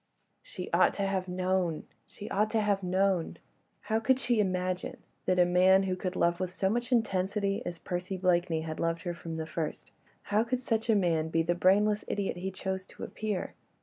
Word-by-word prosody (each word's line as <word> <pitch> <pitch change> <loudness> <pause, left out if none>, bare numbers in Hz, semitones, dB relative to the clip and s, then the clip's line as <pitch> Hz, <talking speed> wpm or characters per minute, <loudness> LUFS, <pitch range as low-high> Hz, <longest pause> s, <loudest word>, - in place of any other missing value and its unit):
She - - -7
ought - - +4
to 200 - -1
have 190 -1 -1
known! 180 -2 0 0.2
she 205 - -9
ought 210 +2 +2
to 225 - +1
have 205 -2 +1
known! 185 -1 +1 0.4
How 220 0 0
could 260 +3 +2
she 240 -4 +1
imagine 185 -2 -1 0.3
that 185 - +3
a 180 - +6
man 185 +2 +5
who 185 -1 -1
could 185 0 -4
love 170 0 +2
with 185 -1 -1
so 190 +1 0
much 240 +2 -2
intensity 200 -3 +1
as 175 - -4
Percy 180 +2 -4
Blakeney 175 -3 +1
had 160 0 -5
loved 165 0 -1
her 175 -2 -2
from 165 -1 -6
the 160 - -3
first—how 170 +6 -3
could 245 +2 -1
such 225 -2 -1
a 220 - +5
man 165 -5 +1
be 165 0 +1
the 175 +2 +1
brainless 205 +4 +3
idiot 200 -3 -2
he 185 +2 -3
chose 190 0 -4
to - - -11
appear? 210 -3 -3
185 Hz, 195 wpm, -30 LUFS, 175-205 Hz, 0.4 s, a